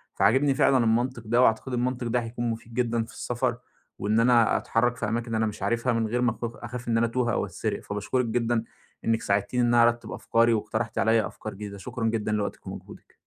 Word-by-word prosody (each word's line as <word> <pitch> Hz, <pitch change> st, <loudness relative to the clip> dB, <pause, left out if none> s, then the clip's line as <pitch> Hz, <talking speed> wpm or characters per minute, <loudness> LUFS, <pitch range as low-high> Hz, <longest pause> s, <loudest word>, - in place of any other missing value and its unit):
فعاجبني 130 Hz, +8 st, +3 dB
فعلًا 135 Hz, 0 st, +4 dB
المنطق 120 Hz, +1 st, +1 dB
ده 120 Hz, +3 st, +3 dB
وأعتقد 125 Hz, +2 st, +2 dB
المنطق 125 Hz, 0 st, -1 dB
ده 120 Hz, +1 st, +1 dB
هيكون 120 Hz, +1 st, -3 dB
مفيد 115 Hz, 0 st, -6 dB
جدًا 120 Hz, -2 st, 0 dB
في 115 Hz, -, -14 dB
السفَر، 120 Hz, +1 st, -2 dB, 0.4 s
وإن 110 Hz, +3 st, +1 dB
أنا 115 Hz, -1 st, +4 dB
أتحرك 120 Hz, +1 st, +1 dB
في -, -, -2 dB
أماكن 115 Hz, +1 st, -2 dB
أنا 110 Hz, 0 st, +2 dB
مش 105 Hz, 0 st, -5 dB
عارفها 120 Hz, +1 st, +1 dB
من 115 Hz, -1 st, 0 dB
غير 120 Hz, +3 st, -1 dB
ما 120 Hz, -1 st, +3 dB
أك 110 Hz, -, -11 dB, 0.2 s
أخاف 120 Hz, 0 st, -7 dB
إن 115 Hz, -1 st, +2 dB
أنا 115 Hz, -, +3 dB
أتوه 120 Hz, -1 st, 0 dB
أو -, -, 0 dB
أتسرق، -, -, -4 dB
فباشكرِك 105 Hz, +5 st, -1 dB
جدًا 115 Hz, 0 st, 0 dB, 0.4 s
إنِك 115 Hz, 0 st, +1 dB
ساعدتيني 100 Hz, +5 st, 0 dB
إن 120 Hz, -, +3 dB
أنا 120 Hz, -1 st, +6 dB
أرتِّب 120 Hz, 0 st, +1 dB
أفكاري 115 Hz, 0 st, +2 dB
واقترحتِ 110 Hz, +1 st, -2 dB
عليّا 110 Hz, +1 st, +3 dB
أفكار 110 Hz, -, -8 dB
جديدة، 100 Hz, 0 st, -7 dB
شكرًا 115 Hz, +4 st, -5 dB
جدًا 110 Hz, -1 st, 0 dB
لوقتِك 105 Hz, -1 st, -3 dB
ومجهودِك. -, -, -10 dB
115 Hz, 210 wpm, -26 LUFS, 110-120 Hz, 0.4 s, أنا